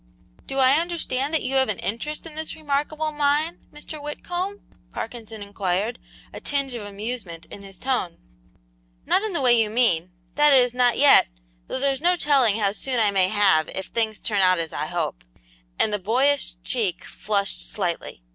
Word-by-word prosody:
"Do 270 Hz, -, -4 dB
I 265 Hz, +2 st, +5 dB
understand 315 Hz, -5 st, -2 dB
that 320 Hz, -, 0 dB
you 265 Hz, -, -3 dB
have 265 Hz, -3 st, +3 dB
an 210 Hz, -, -1 dB
interest 295 Hz, +11 st, -4 dB
in 325 Hz, -, -8 dB
this 315 Hz, +1 st, -5 dB
remarkable 305 Hz, +1 st, -2 dB
mine, 295 Hz, +2 st, 0 dB
Mr. 295 Hz, 0 st, -8 dB
Whitcomb?" 355 Hz, +7 st, -4 dB, 0.3 s
Parkinson 225 Hz, -2 st, -7 dB
inquired, 200 Hz, +3 st, -2 dB, 0.3 s
a -, -, -7 dB
tinge 275 Hz, -2 st, -1 dB
of 235 Hz, -, -5 dB
amusement 205 Hz, -5 st, -6 dB
in 200 Hz, -, -9 dB
his 195 Hz, -1 st, -10 dB
tone. 250 Hz, -9 st, -2 dB, 0.9 s
"Not -, -, +3 dB
in 430 Hz, -2 st, -2 dB
the 335 Hz, -, -1 dB
way 250 Hz, -2 st, +5 dB
you 225 Hz, -2 st, +3 dB
mean; 210 Hz, -7 st, +1 dB, 0.2 s
that 295 Hz, 0 st, +5 dB
is, 250 Hz, -2 st, +4 dB
not 245 Hz, -2 st, +3 dB
yet, 285 Hz, 0 st, +7 dB, 0.4 s
though -, -, -4 dB
there's 275 Hz, 0 st, 0 dB
no 355 Hz, +2 st, +3 dB
telling 275 Hz, -, +3 dB
how 205 Hz, -3 st, +1 dB
soon 250 Hz, +4 st, -2 dB
I 210 Hz, -2 st, +4 dB
may 190 Hz, -2 st, +4 dB
have 190 Hz, -6 st, +3 dB
if 190 Hz, -, -5 dB
things 220 Hz, -2 st, 0 dB
turn 205 Hz, -3 st, 0 dB
out 185 Hz, -1 st, +4 dB
as 165 Hz, -1 st, -3 dB
I 150 Hz, -, -3 dB
hope," 170 Hz, -, -3 dB, 0.5 s
and 215 Hz, -, +2 dB
the 210 Hz, -, 0 dB
boyish 255 Hz, +3 st, +1 dB
cheek 210 Hz, -8 st, -1 dB
flushed 200 Hz, -, -1 dB
slightly. -, -, -3 dB
245 Hz, 180 wpm, -24 LUFS, 200-290 Hz, 0.9 s, yet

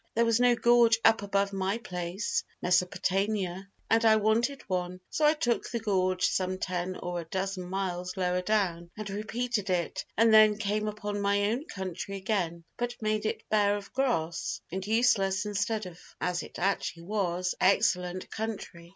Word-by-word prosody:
There 235 Hz, +1 st, +3 dB
was 230 Hz, 0 st, +3 dB
no 245 Hz, -1 st, +5 dB
gorge 235 Hz, -1 st, +5 dB
up 225 Hz, -2 st, +5 dB
above 200 Hz, 0 st, 0 dB
my 195 Hz, +2 st, -1 dB
place 180 Hz, -3 st, -3 dB, 0.2 s
[Mesopotamia] 190 Hz, +1 st, 0 dB, 0.2 s
and 225 Hz, +1 st, +3 dB
I 220 Hz, -1 st, +6 dB
wanted 225 Hz, +6 st, +1 dB
one, 180 Hz, -1 st, -2 dB
so 305 Hz, -, +1 dB
I 300 Hz, +1 st, +5 dB
took 240 Hz, -6 st, 0 dB
the 235 Hz, -, -2 dB
gorge 185 Hz, -4 st, +1 dB
some 185 Hz, 0 st, 0 dB
10 185 Hz, 0 st, -3 dB
or 175 Hz, 0 st, -4 dB
a -, -, -10 dB
dozen 190 Hz, +1 st, -3 dB
miles 185 Hz, -1 st, -3 dB
lower 180 Hz, -1 st, +1 dB
down 180 Hz, -4 st, 0 dB
and 215 Hz, -1 st, -5 dB
repeated 215 Hz, 0 st, -2 dB
it 175 Hz, -3 st, -1 dB
and 225 Hz, 0 st, +5 dB
then 215 Hz, -1 st, +7 dB
came 210 Hz, 0 st, -1 dB
upon 205 Hz, -1 st, -3 dB
my 200 Hz, +1 st, +2 dB
own 255 Hz, +6 st, -2 dB
country 190 Hz, -, -5 dB
again, 185 Hz, -4 st, -2 dB
but 240 Hz, 0 st, -3 dB
made 215 Hz, 0 st, 0 dB
it -, -, -4 dB
bare 205 Hz, -1 st, +3 dB
of 200 Hz, -1 st, -10 dB
grass 200 Hz, -12 st, -1 dB
and 190 Hz, +2 st, -4 dB
useless 210 Hz, -4 st, +2 dB
instead 210 Hz, +1 st, -1 dB
of 180 Hz, -1 st, -10 dB, 0.2 s
(as 180 Hz, 0 st, -1 dB
it -, -, -10 dB
actually 175 Hz, -2 st, -1 dB
was) 180 Hz, -2 st, -1 dB
excellent 180 Hz, -1 st, +2 dB
country. 210 Hz, -6 st, -5 dB
200 Hz, 170 wpm, -29 LUFS, 180-220 Hz, 0.2 s, then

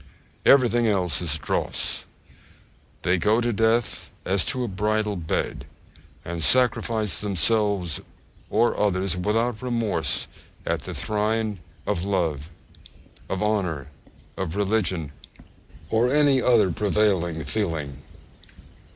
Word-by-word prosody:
Everything 120 Hz, -3 st, +5 dB
else 95 Hz, -6 st, +1 dB
is 80 Hz, -3 st, -1 dB
dross. 70 Hz, -, -1 dB, 1.0 s
They 90 Hz, +1 st, +2 dB
go 105 Hz, +5 st, +3 dB
to 120 Hz, -1 st, 0 dB
death 110 Hz, -2 st, +1 dB, 0.2 s
as 95 Hz, 0 st, +2 dB
to 125 Hz, -, -2 dB
a -, -, -2 dB
bridal 105 Hz, +1 st, -1 dB
bed, 85 Hz, -4 st, -3 dB, 0.6 s
and 85 Hz, 0 st, -4 dB
sacrifice 115 Hz, -2 st, +3 dB
themselves 100 Hz, -3 st, +1 dB, 0.5 s
or 115 Hz, +3 st, +2 dB
others 95 Hz, -3 st, +1 dB
without 110 Hz, +5 st, 0 dB
remorse 120 Hz, -4 st, -1 dB, 0.4 s
at -, -, 0 dB
the -, -, -6 dB
shrine 105 Hz, -1 st, -1 dB, 0.3 s
of 85 Hz, -, -1 dB
love, 85 Hz, -7 st, -1 dB, 0.8 s
of 95 Hz, +2 st, -2 dB
honour, 90 Hz, -10 st, -1 dB, 0.5 s
of 90 Hz, -3 st, -3 dB
religion, 95 Hz, -7 st, 0 dB, 0.8 s
or 115 Hz, +2 st, +3 dB
any 140 Hz, -1 st, +3 dB
other 115 Hz, -8 st, +4 dB
prevailing 95 Hz, -5 st, +1 dB
feeling. 75 Hz, -5 st, -2 dB
105 Hz, 110 wpm, -24 LUFS, 90-110 Hz, 1.0 s, Everything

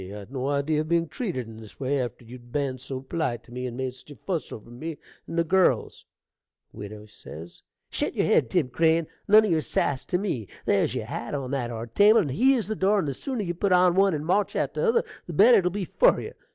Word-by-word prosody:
I'd 100 Hz, +3 st, -9 dB
no 135 Hz, -1 st, -3 dB
idee 145 Hz, +2 st, 0 dB
of 155 Hz, +1 st, -1 dB
being 170 Hz, 0 st, +2 dB
treated 155 Hz, -, -4 dB
in 110 Hz, -1 st, -11 dB
this 110 Hz, -2 st, -13 dB
way, 135 Hz, 0 st, 0 dB
after 120 Hz, -1 st, -6 dB
you'd 120 Hz, +1 st, -13 dB
ben 135 Hz, -2 st, -2 dB
so 130 Hz, +1 st, -6 dB
polite 135 Hz, -4 st, -3 dB
to -, -, -19 dB
me, 125 Hz, +1 st, -4 dB
and 120 Hz, -1 st, -7 dB
made 130 Hz, -1 st, -3 dB
such 130 Hz, -, -15 dB
a 145 Hz, -, -10 dB
fuss 165 Hz, -, -4 dB
over 115 Hz, +2 st, -10 dB
me 155 Hz, +6 st, -6 dB, 0.3 s
and 165 Hz, -, -5 dB
the 170 Hz, -, +4 dB
girls. 170 Hz, -, +1 dB, 0.7 s
Widow 105 Hz, +1 st, -9 dB
Shet 85 Hz, -5 st, -7 dB
yer -, -, +1 dB
head, -, -, +3 dB
Tim 165 Hz, -8 st, +1 dB
Crane; 160 Hz, +4 st, +2 dB, 0.2 s
nun 215 Hz, +2 st, +7 dB
o' -, -, -1 dB
yer 160 Hz, -2 st, +2 dB
sass 135 Hz, +1 st, -1 dB
to 180 Hz, -, 0 dB
me. 160 Hz, -, -3 dB, 0.2 s
There's -, -, +1 dB
your -, -, -3 dB
hat 120 Hz, +5 st, -5 dB
on 135 Hz, -2 st, -4 dB
that 130 Hz, -4 st, -2 dB
are 115 Hz, -1 st, -5 dB
table, 205 Hz, -, +5 dB
and 145 Hz, -8 st, -3 dB
here's 250 Hz, -, +3 dB
the 215 Hz, -, -2 dB
door; 200 Hz, +1 st, +2 dB
and 180 Hz, -7 st, 0 dB
the 140 Hz, -, -1 dB
sooner 250 Hz, -, -3 dB
you 175 Hz, -2 st, -2 dB
put 190 Hz, +3 st, -1 dB
on 180 Hz, 0 st, +5 dB
one 195 Hz, -1 st, +3 dB
and 150 Hz, 0 st, -4 dB
march 195 Hz, +4 st, +1 dB
out -, -, -1 dB
o' -, -, -1 dB
t'other 470 Hz, 0 st, +3 dB, 0.2 s
the 175 Hz, -, -6 dB
better 225 Hz, +10 st, +7 dB
it 185 Hz, -, -3 dB
will -, -, +3 dB
be 195 Hz, +1 st, -3 dB
for -, -, +3 dB
you. 450 Hz, -, -7 dB
150 Hz, 245 wpm, -26 LUFS, 125-185 Hz, 0.7 s, nun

